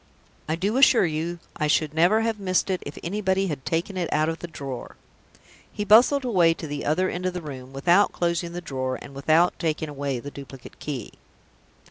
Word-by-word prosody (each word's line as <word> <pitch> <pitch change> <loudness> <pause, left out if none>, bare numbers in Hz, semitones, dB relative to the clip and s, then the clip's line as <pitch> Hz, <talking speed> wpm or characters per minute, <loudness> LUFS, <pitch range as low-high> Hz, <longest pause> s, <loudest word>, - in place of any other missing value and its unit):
I 160 - +1
do 200 +8 -1
assure 260 -6 +6
you 165 +2 -2 0.2
I 150 - 0
should 150 0 +1
never 175 +8 +4
have 225 -1 -1
missed 185 0 +1
it 185 - -1
if 145 - -8
anybody 195 +1 0
had 145 -4 -4
taken 175 +4 -2
it 175 -2 -2
out 155 +1 +2
of 165 - -4
the 175 - -6
drawer!" 140 -6 -7 0.8
He 210 - -4
bustled 245 +7 +6
away 175 -8 +4
to 165 - -7
the 145 -1 -5
other 180 +5 +2
end 180 0 -3
of 180 - -3
the 180 - -3
room 130 -3 -8
without 175 +9 +3
closing 170 0 -1
the 175 - -5
drawer, 130 -5 -3
and 140 - -11
without 155 +5 +2
taking 155 -2 -1
away 140 -3 -3
the 145 +4 -8
duplicate 135 -2 -11
key. 135 -7 -5
165 Hz, 200 wpm, -25 LUFS, 145-185 Hz, 0.8 s, assure